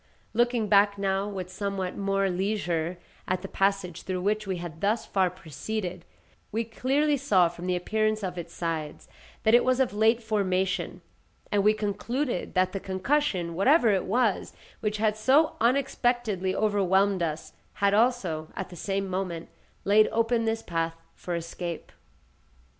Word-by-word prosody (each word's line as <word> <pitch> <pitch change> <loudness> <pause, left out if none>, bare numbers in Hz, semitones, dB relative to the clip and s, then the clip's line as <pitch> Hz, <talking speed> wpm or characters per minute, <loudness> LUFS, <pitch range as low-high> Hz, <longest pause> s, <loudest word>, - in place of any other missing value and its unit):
Looking 240 -1 +2
back 205 0 +4
now, 195 0 0
with 185 -3 -6
somewhat 195 -1 -3
more 195 0 0
leisure, 180 -3 -1 0.3
at 185 0 -1
the - - -4
passage 195 -3 0
through 185 -1 -3
which 210 +2 0
we 190 -2 -1
had 170 -2 -8
thus 215 +3 +1
far 190 -2 +1
proceeded, 180 +2 -5 0.5
we 225 +2 0
clearly 275 +6 +1
saw 200 -11 +3
from 175 +1 -8
the 180 - +1
appearance 215 +4 0
of 180 -2 -3
its 170 -1 -7
sides, 160 -3 -4 0.4
that 220 - +4
it 240 - +7
was 255 0 +2
of 260 -5 +1
late 225 +3 +3
formation, 190 -4 -1 0.5
and 205 -1 +2
we 215 +1 +4
concluded 220 +3 -2
that 185 0 +3
the 195 - -3
concussion, 190 - 0
whatever 240 - +4
it 195 -2 +1
was, 225 0 +1 0.3
which 210 0 -1
had 215 0 +1
so 275 +8 +3
unexpectedly 240 -6 +1
overwhelmed 200 -2 +2
us, 160 -2 -3 0.2
had 200 0 +2
also, 205 -9 +1
at 190 - -5
the - - -9
same 195 +2 -2
moment, 180 -3 -3 0.4
laid 210 +2 +5
open 230 0 +1
this 225 0 -1
path 165 -1 -2 0.2
for 175 - -5
escape. 170 0 -5
195 Hz, 155 wpm, -27 LUFS, 180-220 Hz, 0.5 s, it